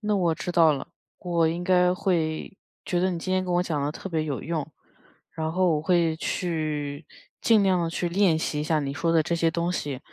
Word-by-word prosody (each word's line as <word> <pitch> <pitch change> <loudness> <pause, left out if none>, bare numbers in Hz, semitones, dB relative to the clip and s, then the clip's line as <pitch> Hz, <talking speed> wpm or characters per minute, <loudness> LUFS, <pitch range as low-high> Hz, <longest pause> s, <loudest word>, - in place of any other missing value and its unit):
那 210 -1 0
我 175 -5 +2
知 180 - -5
道 165 -3 +5
了， 140 - -5 0.3
我 170 -3 +1
应 170 +2 -3
该 180 -1 +4
会 170 -2 -1 0.3
觉 175 - 0
得 185 +1 +2
你 170 - -3
今 185 +2 -3
天 185 0 +1
跟 180 - -2
我 175 - +3
讲 155 -5 -2
的 145 - -1
特 195 - -7
别 160 -3 -1
有 145 -4 -3
用， 160 -3 -2 0.7
然 160 0 -3
后 180 -1 +2
我 150 - -1
会 170 -1 +2
去 155 -4 -3 0.4
尽 220 -3 +4
量 185 -3 +2
地 165 - -1
去 175 +1 -2
练 175 -2 +3
习 150 -2 -2
一 - - -1
下 155 0 +1
你 140 -1 -3
说 165 +4 0
的 165 -1 +4
这 170 +2 -1
些 165 -1 +1
东 170 +2 -1
西， 145 -6 -3
170 Hz, 250 characters per minute, -26 LUFS, 155-180 Hz, 0.7 s, 道